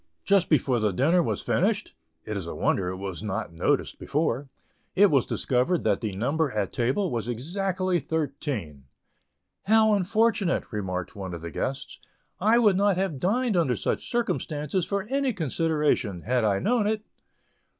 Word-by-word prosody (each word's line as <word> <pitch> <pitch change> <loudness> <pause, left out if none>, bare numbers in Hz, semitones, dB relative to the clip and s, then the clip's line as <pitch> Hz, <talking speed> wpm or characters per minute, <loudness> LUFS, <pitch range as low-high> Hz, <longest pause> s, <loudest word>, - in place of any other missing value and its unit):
Just 200 -3 +3
before 130 -5 +2
the 105 -2 +1
dinner 155 - +3
was - - -2
finished 200 +3 0 0.3
(it 110 - -4
is 95 -4 -4
a - - -5
wonder 95 - +1
it 95 - -5
was 95 -2 -5
not 105 -3 -4
noticed 85 - 0
before) 140 -3 -1 0.5
it 200 0 +6
was 135 -4 +3
discovered 130 +8 0
that 105 -3 +1
the 110 - -2
number 140 +9 0
at 105 -3 -2
table 135 +11 0
was 115 -2 -2
exactly 180 - -1
thirteen. 135 - -4 0.8
"How 220 +1 +5
very 210 - +4
unfortunate," 210 -1 +1
remarked 95 -5 -4
one 95 -3 -5
of 85 - -8
the 85 0 -6
guests; 135 +9 -4 0.4
"I 220 +5 +4
would 210 -6 +4
not 200 -2 +3
have 185 -7 -1
dined 225 - +1
under 160 -8 +2
such - - -2
circumstances 175 - -1
for 200 -1 -1
any 270 +3 0
consideration, 150 - 0
had 125 -1 +1
I 100 -2 +2
known 225 - +1
it!" 215 0 -1
150 Hz, 165 wpm, -26 LUFS, -, 0.8 s, it